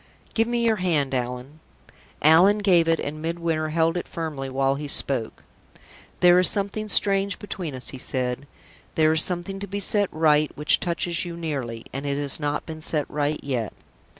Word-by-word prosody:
"Give 225 0 +1
me 235 0 0
your 225 -1 +2
hand, 155 -8 0
Allan." 125 +4 -4 0.6
Allan 175 +7 +6
gave 180 -5 +3
it, 165 0 +2
and 155 +2 -5
Midwinter 165 -1 -2
held 165 +1 +1
it 175 - -5
firmly 150 -5 -5
while 135 +1 +1
he 145 +2 -5
spoke. 130 -5 +1 0.8
"There 180 0 +6
is 180 - +6
something 210 +1 -3
strange 200 -1 +3
between 180 -8 -5
us," 130 - -4
he 130 - -8
said. 125 +1 -2 0.5
"There 155 -1 +4
is 160 0 +5
something 180 +3 0
to 200 - -6
be 200 +1 -4
set 205 0 +1
right 155 -1 +2
which 150 +1 +3
touches 170 0 -1
you 170 -1 -7
nearly; 135 -9 -5
and 135 +2 -4
it 140 0 -1
has 145 0 -1
not 145 0 -2
been 160 -1 -8
set 155 -2 -1
right 150 +1 -1
yet. 125 -7 -3
160 Hz, 180 wpm, -24 LUFS, 140-180 Hz, 0.8 s, Allan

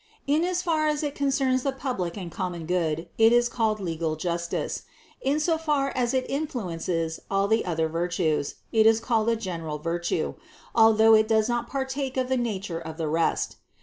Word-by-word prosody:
In 295 +4 +2
as 360 0 0
far 315 -3 +1
as 300 0 0
it 290 -1 -2
concerns 270 -2 +1
the 275 - 0
public 245 -11 -3
and 180 -4 -6
common 175 -3 -4
good, 165 -1 -1
it 225 0 +7
is 240 0 +4
called 220 -3 0
legal 165 -4 -2
justice; 170 +1 -2 0.4
in 280 +3 +1
so 320 +1 +1
far 290 -4 0
as 240 -1 0
it 255 - 0
influences 175 - -2
all 195 0 +2
the 220 +2 +2
other 165 -2 0
virtues, 165 -2 -1 0.2
it 220 -1 +5
is 225 0 +5
called 225 -1 +1
a 230 - +3
general 165 -8 -4
virtue, 165 +1 -2 0.4
although 225 -1 +6
it 215 0 +5
does 220 -1 +3
not 240 -1 -1
partake 265 0 -3
of 255 -1 0
the 260 - +2
nature 200 -8 -2
of 160 -1 -8
the 160 -2 -2
rest. 160 +2 0
220 Hz, 185 wpm, -26 LUFS, 170-265 Hz, 0.4 s, it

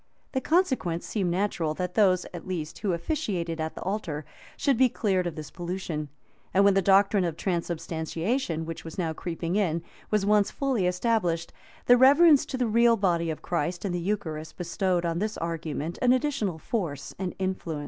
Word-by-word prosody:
The 260 - -1
consequence 260 - +1
seemed 195 -5 -1
natural, 175 -4 0
that 180 +1 -3
those, 185 -4 +3
at 175 - -8
least, 165 -4 -4
who 205 -3 0
officiated 170 - -2
at 160 0 -3
the - - -6
altar, 175 -7 -3 0.3
should 275 - +2
be 255 +2 +4
clear 200 -5 0
of 175 -3 -4
this 155 -2 -7
pollution; 170 -4 -4 0.5
and 195 +1 +6
when 200 - +6
the 195 - +3
doctrine 195 +1 +4
of 165 -2 -2
transubstantiation, 170 - -2
which 165 0 -6
was 165 - -9
now 165 -4 -1
creeping 170 +2 -3
in,[] 170 -5 0 0.3
was 210 -2 +1
once 210 -1 +4
fully 260 -10 0
established, 180 -3 0 0.3
the 245 - +7
reverence 285 +3 +6
to 260 - -3
the 250 - +1
real 230 +1 +4
body 170 -4 +1
of 155 - -5
Christ 175 +2 -2
in 195 - -1
the 175 - -1
eucharist 170 -5 -3
bestowed 180 0 0
on 170 0 -1
this 215 +2 -2
argument 165 -1 -4
an 250 0 +5
additional 255 - 0
force 160 - -3
and 185 -2 -3
influence. 185 -5 -3
180 Hz, 180 wpm, -27 LUFS, 165-210 Hz, 0.5 s, the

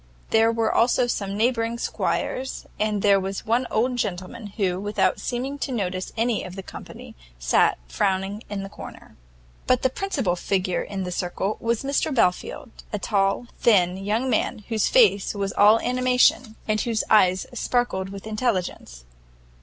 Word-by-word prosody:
There 225 0 +4
were 225 -1 0
also 245 +1 +3
some 200 -4 -3
neighbouring 230 0 +1
squires; 260 +2 -2
and 210 -2 0
there 200 -1 +5
was 195 +1 -4
one 240 +3 +1
old 245 +3 0
gentleman, 205 +1 -4
who, 185 -4 0
without 205 +1 0
seeming 265 +3 -3
to 275 - -3
notice 185 -5 -3
any 230 -1 +1
of 180 0 -8
the 195 - -7
company, - - -10 0.2
sat - - +2
frowning 195 - -1
in 200 -1 -4
a - - -6
corner. - - -11 0.5
But 255 -1 +2
the 260 - +2
principal 270 - -1
figure 185 0 -1
in 195 -2 -4
the 180 - -4
circle 185 +3 -2
was 230 +1 -1
Mr 280 +3 0
Belfield, 180 -9 0 0.2
a - - -1
tall, 195 +3 0
thin 185 -6 +4
young 210 +6 -1
man, 220 -3 0
whose 220 -2 +1
face 435 - +4
was 195 -1 -2
all 210 +2 +6
animation, 250 -2 +2
and 215 0 +1
whose 230 -3 0
eyes 185 -3 +4
sparkled 245 -6 -1
with 195 +1 -9
intelligence. 190 - -3
215 Hz, 160 wpm, -24 LUFS, 195-240 Hz, 0.5 s, all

